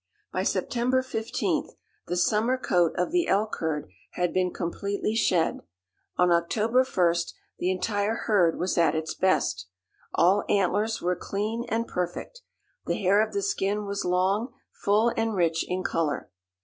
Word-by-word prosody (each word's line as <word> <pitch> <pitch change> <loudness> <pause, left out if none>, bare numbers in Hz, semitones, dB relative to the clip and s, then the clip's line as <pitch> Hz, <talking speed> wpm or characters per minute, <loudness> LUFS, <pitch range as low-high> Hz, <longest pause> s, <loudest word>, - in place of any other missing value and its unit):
By - - 0
September 255 +1 0
15th 225 -3 -2 0.3
the 180 - -2
summer 215 +8 +2
coat 175 -9 +2
of 180 - 0
the 350 -1 +2
elk 210 +2 +1
herd 155 -5 -2 0.3
had 180 -1 -1
been 185 -1 +1
completely 200 +4 -2
shed. 185 -7 +2 0.6
On 180 0 +4
October 215 +9 +2
1st 170 -8 +1 0.3
the 180 - 0
entire 205 +3 0
herd 180 -7 +3
was 180 0 0
at 165 -2 +3
its 160 0 -2
best. 105 - +1 0.5
All 185 +4 +4
antlers 205 +3 +1
were 180 +1 +1
clean 215 +6 -3
and 230 +1 -1
perfect. 180 - -4 0.5
The - - 0
hair 200 +2 +3
of - - -4
the 400 0 -1
skin 210 - -1
was 200 0 -3
long, 190 +7 +1 0.2
full 215 +4 +2
and 225 -1 0
rich 165 -3 +1
in 185 +1 -1
color. 160 -5 -1
195 Hz, 150 wpm, -27 LUFS, 175-225 Hz, 0.6 s, On